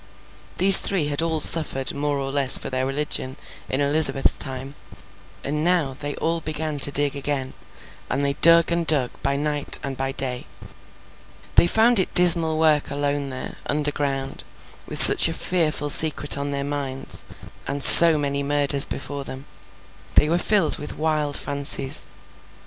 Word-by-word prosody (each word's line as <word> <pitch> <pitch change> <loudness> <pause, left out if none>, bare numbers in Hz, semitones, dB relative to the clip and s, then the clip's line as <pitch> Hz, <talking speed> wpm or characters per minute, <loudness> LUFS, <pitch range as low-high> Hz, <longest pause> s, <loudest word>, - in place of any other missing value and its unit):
These 195 +1 +8
three 170 -7 -4
had 145 +1 -4
all 165 -1 -4
suffered 145 -4 +4
more 145 0 -5
or 135 0 -7
less 135 -2 +4
for - - -10
their 130 0 -5
religion 135 -2 -6 0.3
in 130 - -4
Elizabeth's 140 -1 +2
time. 135 0 -9 0.7
And 150 +2 -6
now, 170 -6 -3
they 145 +2 -8
all 165 0 -5
began 155 -1 -7
to 145 - +3
dig 145 0 -3
again, 140 -2 -6 0.6
and 140 - -3
they 140 - -2
dug 170 +3 +2
and 170 -1 -4
dug 135 -6 +1
by 140 0 -4
night 145 0 -1
and 135 -1 -7
by 135 +1 -6
day. 130 -3 -5 1.1
They - - +2
found 225 +4 +1
it 185 - -5
dismal 170 -3 +3
work 155 -2 -2
alone 145 0 -6
there, 130 -1 -10
underground, 145 -2 -6 0.4
with - - -4
such - - +7
a - - -7
fearful 155 -5 -2
secret 150 -1 +2
on 140 0 -7
their 140 0 -6
minds, 140 -2 -4 0.4
and 140 0 -1
so 165 -2 +10
many 140 -1 -5
murders 140 0 +2
before 140 -1 -9
them. 135 0 -12 0.7
They 150 - +1
were 170 +2 -2
filled 195 -4 -2
with 150 - -10
wild 150 -2 -4
fancies. 140 -1 0
145 Hz, 160 wpm, -19 LUFS, 140-155 Hz, 1.1 s, so